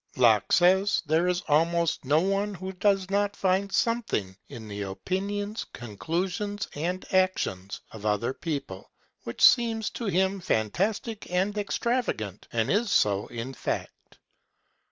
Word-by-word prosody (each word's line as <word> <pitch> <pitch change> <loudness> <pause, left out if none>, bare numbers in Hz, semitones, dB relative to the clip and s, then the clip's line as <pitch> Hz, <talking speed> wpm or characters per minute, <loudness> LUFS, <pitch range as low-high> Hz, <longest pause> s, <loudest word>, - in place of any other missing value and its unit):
Locke 115 -6 +4
says 190 +2 +4
there 160 +3 +2
is 180 0 +1
almost 165 +1 +2
no 150 +4 +3
one 195 +2 0
who 190 +1 -6
does 195 0 +1
not 205 0 +1
find 195 +1 +1
something 220 - 0
in 110 -2 -9
the 105 0 -6
opinions, 200 - -3
conclusions, 180 - -3
and 175 +5 -3
actions 145 - 0
of 110 -2 -10
other 105 +4 0
people 140 - -5 0.4
which 115 - -4
seems 230 -3 +5
to 235 - -5
him 190 0 +1
fantastic 195 - -1
and 190 +4 0
extravagant, 205 - -2
and 115 -2 0
is 210 +3 +2
so 105 - +2
in 120 +3 -6
fact. - - -5
180 Hz, 135 wpm, -27 LUFS, -, 0.4 s, seems